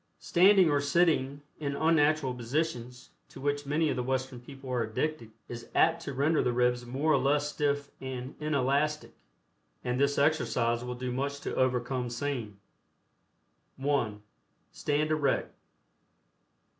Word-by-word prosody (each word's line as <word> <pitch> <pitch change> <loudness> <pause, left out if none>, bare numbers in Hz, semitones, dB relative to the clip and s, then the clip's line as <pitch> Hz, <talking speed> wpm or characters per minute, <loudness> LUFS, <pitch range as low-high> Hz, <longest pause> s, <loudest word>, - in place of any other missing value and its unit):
Standing 190 +1 +5
or 145 -1 +2
sitting 145 -2 +1 0.2
in 140 -2 -2
unnatural 155 -3 +2
positions, 125 0 -3 0.2
to - - -12
which 145 +1 -2
many 155 +3 +1
of 135 - 0
the 125 - -1
Western 130 0 -2
people 135 +2 -12
are 125 -2 +1
addicted, 115 +3 -2 0.2
is 120 -1 -8
apt 165 +1 +3
to 140 -4 -5
render 150 +4 +2
the 125 - +1
ribs 125 0 +1
more 140 +6 +1
or 140 - +4
less 145 +2 +2
stiff 145 -1 -1
and 130 0 -5
inelastic, 150 0 0 0.7
and 125 +1 -1
this 140 0 +2
exercise 120 -5 +1
will 125 0 -4
do 125 0 -4
much 140 +3 -2
to - - -4
overcome 125 -1 0
same. 120 -5 -4 1.2
(1) 135 -7 -1 0.5
Stand 150 +1 -1
erect. 145 -3 0
140 Hz, 140 wpm, -29 LUFS, 125-150 Hz, 1.2 s, Standing